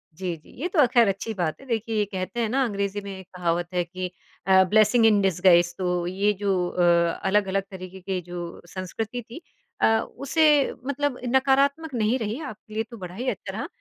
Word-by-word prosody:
जी, 180 0 -3
जी, 155 - -21
ये 345 - 0
तो 360 -2 -1
अ, 290 - +8
ख़ैर 240 -2 +4
अच्छी 195 +3 -2
बात 175 -6 -2
है। - - -13
देखिए, 225 -2 -2
ये 210 - +2
कहते 190 +4 -4
हैं 225 - 0
ना, 265 +4 +2
अंग्रेजी 200 -3 -2
में 200 -1 -7
एक 190 - -13
कहावत 175 -1 0
है 180 -1 +1
कि 180 +1 -6 0.4
अ, 190 0 +7
ब्लेसिंग 215 +4 +4
इन 210 -2 +5
डिसगाइज़, 175 -2 +4
तो 180 -2 -1
ये 195 +3 +1
जो 185 -3 +1
अ, 180 - -2 0.4
अलग-अलग 195 0 +1
तरीके 185 0 -9
के 185 0 -2
जो 175 -1 -6
संस्कृति 215 +6 -4
थी 235 +7 -11 0.4
अ, 225 0 +4 0.2
उसे 295 0 +3
मतलब 280 -1 -1 0.2
नकारात्मक 275 +3 +2
नहीं 230 +1 +1
रही, 220 +3 -3
आपके 215 -5 -9
लिए 220 - 0
तो 235 - -8
बाद 180 -4 -7
ही 255 +2 -1
अच्छा - - -5
रहा। - - -3
205 Hz, 205 wpm, -25 LUFS, 185-240 Hz, 0.4 s, अ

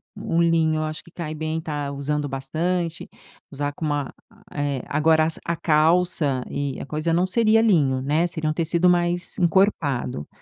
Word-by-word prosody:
Um 165 - -1
linho 165 -2 +2
eu - - -1
acho 155 0 -5
que 170 - -18
cai 165 -3 -5
bem, 155 +1 -3
está 145 -3 -4
usando 145 +1 -2
bastante. 160 +5 -2 0.4
Usar 145 +1 -2
com 160 - -5
uma, 145 -2 -2 0.4
eh 145 -3 -2
agora 155 +1 +3
es 160 - -2
a 170 - -1
calça 155 -4 +2
e 140 -2 -3
a - - -6
coisa 155 +3 -2
não 175 +2 +3
seria 225 +3 +3
linho, 145 -12 +3
né, 150 +5 +1
seria 160 -3 -3
um - - 0
tecido 170 +2 +2
mais 175 0 0
encorpado. 160 - +1
155 Hz, 175 wpm, -23 LUFS, 145-170 Hz, 0.4 s, agora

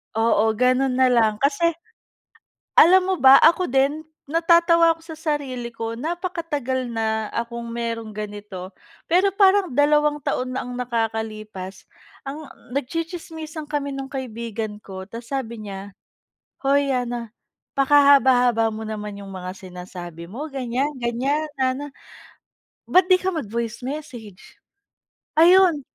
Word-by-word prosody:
Oo 225 -1 +3
ganun 255 +3 +2
na 260 0 +4
lang 220 -3 +2
kasi, 305 +4 +2 1.0
alam 370 +3 +8
mo 375 - +2
ba, 265 -2 +8
ako 340 +3 +5
din, 275 +4 +1 0.2
natatawa 335 +1 +4
ako 330 - -21
sa 325 -1 -10 0.2
sarili 255 -5 -5
ko 230 0 -5
napaka-tagal 315 -5 -3
na 220 -1 -2
akong 235 0 -4
meron 230 -2 -4
ganito. 205 -3 -7 0.4
Pero 370 +3 +3
parang 390 -5 +4
2 295 +1 +3
taon 255 -1 -2
na 260 - -2
ang 250 0 -7
nakakalipas, 220 -5 -4 0.3
ang 290 +3 -7 0.3
nag-tsitsismisan 320 +1 -5
kami 290 -1 -3
nung 270 -1 -6
kaibigan 230 -4 -5
ko 190 -2 -9
tapos 230 +2 -10
sabi 235 -5 -4
niya, 195 0 -7 0.7
"Hoy 275 0 +2
Ana, 240 -3 -3 0.4
pakahaba-haba 265 -5 +5
mo 220 0 -6
naman 210 -1 -6
yung 200 -1 -9
mga 185 0 -7
sinasabi 180 -3 -9
mo 260 +10 -6
ganyan-ganyan, 265 +2 -1
Ana. 265 +2 -1 1.0
Ba't 370 +1 +3
di 370 - +7
ka 370 -1 -2
mag 265 -11 -4
voice 230 +1 -4
message?" 250 -8 -8 0.9
Ayun. 355 -2 +6
255 Hz, 125 wpm, -22 LUFS, 220-300 Hz, 1.0 s, alam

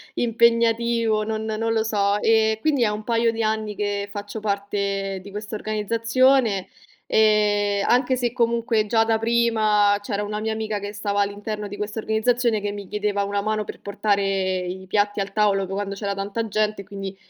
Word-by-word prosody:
impegnativo, 230 -1 +2
non 220 0 -3
non 225 +1 -1
lo 220 -1 +1
so. 205 -2 +1
E 220 -1 +3
quindi 285 -4 +2
è 215 - +3
un 210 +1 -4
paio 230 0 +2
di 225 0 -3
anni 215 -1 -1
che 205 0 -2
faccio 205 +1 -6
parte 200 -1 -2
di 200 - -11
questa 210 +1 -6
organizzazione 230 +1 +1 0.4
e 205 -2 +3
anche 250 +1 +3
se, 245 -2 -1
comunque, 230 -2 +1
già 225 +1 +3
da 225 0 +1
prima, 220 -3 +3
c'era 205 -2 -2
una 210 +1 -3
mia 220 +1 -2
amica 220 -1 -3
che 205 0 -6
stava 205 -1 -1
all'interno 205 +1 -3
di 205 - -8
questa 210 +1 -5
organizzazione 220 +1 +1
che 205 0 -2
mi 205 -1 -7
chiedeva 205 0 -1
una 200 0 -1
mano 215 +1 -1
per - - -9
portare 200 0 0 0.4
i 185 +1 -6
piatti 205 +1 +1
al 195 0 -3
tavolo 205 -2 +2
quando 200 +1 -4
c'era 200 0 -3
tanta 200 +3 -3
gente, 215 -1 -1
quindi, 195 -1 -7
210 Hz, 175 wpm, -23 LUFS, 205-225 Hz, 0.4 s, E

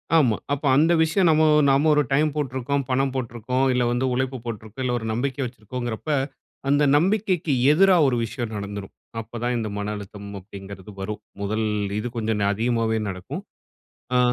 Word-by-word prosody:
ஆமா. 125 -9 +4 0.2
அப்ப 145 +1 -3
அந்த 160 +4 +4
விஷயம் 175 +3 +2
நம்ம 155 0 +4 0.3
நம்ம 140 +3 +4
ஒரு 150 0 +4
டைம் 150 +3 +3
போட்டிருக்கிறோம், 140 0 -1
பணம் 135 +1 +1
போட்டிருக்கிறோம், 125 +1 -1
இல்ல 125 - +2
வந்து 120 +2 0
உழைப்பு 130 +1 -1
போட்டிருக்கிறோம், 110 +2 -6
இல்ல 125 - 0
ஒரு 115 - -7
நம்பிக்கை 135 +4 -2
வச்சிருக்கிறோங்கிறப்ப, 120 +3 -5 0.6
அந்த 145 +1 +4
நம்பிக்கைக்கு 185 -3 +1 0.2
எதிரா 190 +3 +5
ஒரு 125 - +2
விஷயம் 115 0 -5
நடந்துரும். 100 -1 -6 0.3
அப்ப 115 +2 -8
தான் 125 0 +1
இந்த 110 -2 -2
மன 105 +1 -2
அழுத்தம் 100 0 -9
அப்படிங்கிறது 95 0 -10
வரும். 105 +2 -4 0.2
முதல் 110 +2 -1 0.3
இது 120 - -3
கொஞ்சம் 110 -1 0
ந 100 - +2
அதிகமாவே 115 0 0
நடக்கும். 90 -1 -6 0.7
ஆ - - +5
120 Hz, 165 wpm, -24 LUFS, 110-140 Hz, 0.7 s, எதிரா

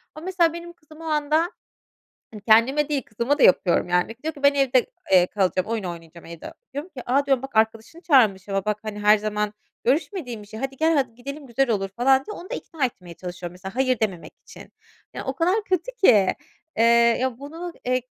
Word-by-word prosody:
Ama 310 +2 -9
mesela 350 -3 +2
benim 340 0 -8
kızım 310 -1 -17
o - - -10
anda, 310 +2 +1 0.8
hani, 215 -2 -10
kendime 240 +8 +4
değil 290 -2 0
kızıma 235 +7 -1
da - - +4
yapıyorum 180 -1 +4
yani 180 +5 +1
diyor 320 +1 -2
ki: 285 -2 -14
"Ben 280 0 +6
evde, 265 -3 +3 0.3
eee, 180 -1 +6
kalacağım 185 -2 0
oyun 225 -2 -2
oynayacağım 170 -1 -8
evde." 165 -1 -9 0.2
Diyorum 290 +6 -5
ki, 250 - -6
"A!" 275 +3 +2
diyorum, 270 -2 +1
"Bak 270 -3 -8
arkadaşını 220 +8 0
çağırmış 215 - +3
ama 195 -1 -1
bak, 210 0 -1
hani, 215 -1 -6
her 210 +1 +5
zaman 210 0 -2 0.3
görüşmediğin 260 - -1
bir - - -16
şey. 220 +1 -9
Hadi, 270 +1 -4
gel, 320 +1 +2
hadi, 260 -5 0
gidelim 280 +4 -8
güzel 260 +2 0
olur." 195 -3 0
falan 265 +6 +2
diye 425 - -6
onu 365 +4 -10
da - - -3
ikna 305 - -3
etmeye 180 -8 -7
çalışıyorum 175 0 -7
mesela 190 +3 -9
hayır 255 -2 +1
dememek 195 -6 -3
için. - - -13 0.4
Ya, - - -6
o - - -3
kadar 370 +6 +1
kötü 375 +4 -1
ki, 205 - +6 0.5
eee, 235 +2 +4
bunu, 325 +6 -8
eee, 255 0 +1
250 Hz, 205 wpm, -23 LUFS, 210-295 Hz, 0.8 s, Ben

